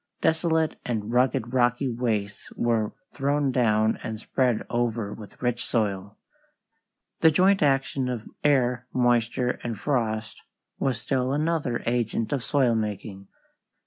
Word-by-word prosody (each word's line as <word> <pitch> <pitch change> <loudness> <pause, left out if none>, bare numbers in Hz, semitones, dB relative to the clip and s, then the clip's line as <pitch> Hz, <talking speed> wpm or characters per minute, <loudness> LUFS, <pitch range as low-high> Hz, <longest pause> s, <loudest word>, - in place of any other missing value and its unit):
Desolate 160 -1 +1
and 110 -2 -3
rugged 125 -1 +1
rocky 125 +1 +2
wastes 115 -4 -2
were 115 -3 +1 0.2
thrown 140 0 +1
down 110 -3 +2
and 110 -1 -5
spread 125 -1 0
over 115 -3 -1
with 105 -2 -12
rich 120 -1 0
soil." 100 -3 -2 1.0
The 160 - +6
joint 190 +5 +4
action 135 -2 +1
of 120 -3 -4 0.2
air, 125 -4 +2
moisture, 120 0 +1
and 115 -4 -4
frost 115 -5 -1 0.4
was 135 -2 0
still 130 -1 0
another 150 -5 0
agent 115 0 0
of 135 -4 -1
soil 130 -4 +2
making. 105 -2 -4
120 Hz, 125 wpm, -26 LUFS, 110-135 Hz, 1.0 s, The